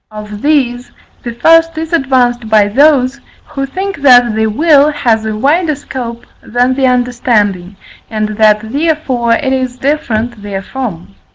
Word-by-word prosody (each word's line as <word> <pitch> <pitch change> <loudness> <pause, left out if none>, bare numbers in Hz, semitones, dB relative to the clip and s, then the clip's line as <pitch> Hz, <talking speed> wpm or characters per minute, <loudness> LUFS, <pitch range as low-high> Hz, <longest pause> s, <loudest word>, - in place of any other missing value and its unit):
Of 210 -1 -9
these, 255 -5 0 0.3
the 240 - -6
first 330 +6 +3
is 320 +1 -5
advanced 245 -6 +1
by 215 -2 +4
those, 275 +1 +2 0.3
who 275 -3 -4
think 390 +7 -4
that 245 -4 +5
the 220 0 0
will 290 +5 +3
has 235 -7 0
a 215 - -3
wider 305 +6 +1
scope 240 -4 -7 0.2
than 245 +3 0
the 265 0 +1
understanding, 230 -7 0 0.3
and 215 -1 -2
that 215 0 +2
therefore 280 -6 0
it 265 +2 -1
is 255 -1 -2
different 240 -5 -2
therefrom. 200 -1 -6
245 Hz, 145 wpm, -12 LUFS, 220-285 Hz, 0.3 s, that